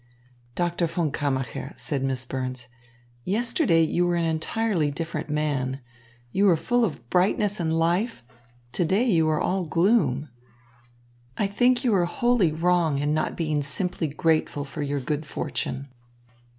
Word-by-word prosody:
"Doctor 175 -1 0
von 165 -2 -1
Kammacher," 135 -2 -2
said 140 -3 -2
Miss 130 -2 -2
Burns, 130 -1 -4 0.6
"yesterday 220 - +2
you 175 +2 +1
were 175 - +1
an 170 -1 +1
entirely 165 +1 0
different 160 +1 -4
man. 140 -3 -1 0.5
You 200 +8 +2
were 185 -4 +6
full 245 +9 +1
of 150 - -3
brightness 200 +3 +2
and 160 -2 0
life; 175 - 0 0.5
to 175 - 0
day 190 +7 +2
you 165 -7 +3
are 155 -1 +1
all 190 0 0
gloom. 165 - +2 1.1
I - - +1
think 245 +5 +2
you 240 -4 +2
are 180 -3 +3
wholly 235 -2 +2
wrong 165 -2 +2
in 145 +2 0
not 155 - -1
being 155 -3 0
simply 170 +3 -1
grateful 155 0 0
for 140 +2 -7
your 145 0 -1
good 150 +3 -2
fortune. 140 -2 -4
165 Hz, 150 wpm, -25 LUFS, 145-190 Hz, 1.1 s, were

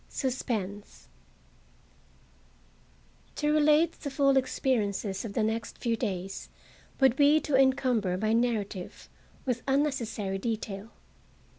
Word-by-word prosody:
SUSPENSE 215 -6 -4 2.3
To 300 0 +1
relate 305 +2 +4
the 285 - -4
full 275 0 +3
experiences 220 -7 0
of 215 -3 -6
the 220 - +1
next 225 +1 -2
few 230 -1 0
days 195 -4 -4 0.5
would 265 -3 +5
be 290 +2 +5
to 290 - 0
encumber 260 -8 +2
my 215 +3 0
narrative 220 -6 -2 0.4
with 250 -2 -1
unnecessary 235 -8 0
detail. 215 -1 -4
235 Hz, 105 wpm, -29 LUFS, 205-270 Hz, 2.3 s, would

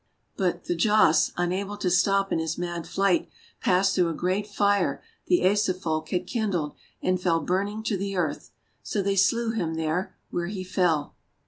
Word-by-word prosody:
But 180 -2 -1
Thjasse, 175 -2 +3
unable 190 +4 -1
to 180 - -1
stop 195 +2 +3
in - - +1
his 160 0 -2
mad 175 -1 -4
flight, 195 -3 +1 0.3
passed 190 +1 +3
through 180 -2 +2
a 165 - -3
great 185 +5 -1
fire 205 -1 +1 0.2
the 355 - +4
Asa 200 -2 +2
Folk 155 -4 -3
had 180 0 -1
kindled, 185 -9 -1 0.3
and 185 -1 +1
fell 170 -2 +2
burning 200 +4 -1
to 220 -2 0
the 195 +1 -3
earth. 160 -5 -2 0.3
So 205 - -2
they 200 0 +1
slew 225 +4 +2
him 170 -8 -2
there, 160 +3 -2 0.2
where 175 0 -2
he 190 -1 -4
fell. 175 -5 0
185 Hz, 175 wpm, -26 LUFS, 175-200 Hz, 0.3 s, the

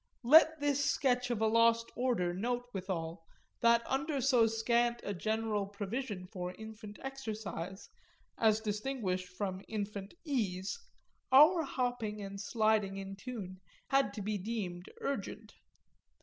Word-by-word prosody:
Let 315 +5 +7
this 285 -1 +1
sketch 250 -3 +1
of 235 -3 -1
a - - +4
lost 230 +1 +4
order 235 -9 +1
note 245 +6 -2
withal 175 -3 -4 0.4
that 235 0 +5
under 280 +2 -1
so 250 -3 +4
scant 235 +2 +1
a 205 - -2
general 215 +1 -1
provision 205 0 -4
for 180 -2 -6
infant 220 -1 -9
exercise, 215 -8 -5 0.5
as 220 -1 +3
distinguished 210 -4 -2
from 185 0 -4
infant 205 - -5
ease, 205 - -1 0.5
our 305 +6 +8
hopping 245 -7 -2
and 195 0 -6
sliding 215 -2 +1
in 195 0 -6
tune 195 -4 -7 0.3
had 275 -6 +3
to 205 - -4
be 210 0 -1
deemed 185 -4 -4
urgent. 220 -4 -4
220 Hz, 130 wpm, -33 LUFS, 195-245 Hz, 0.5 s, our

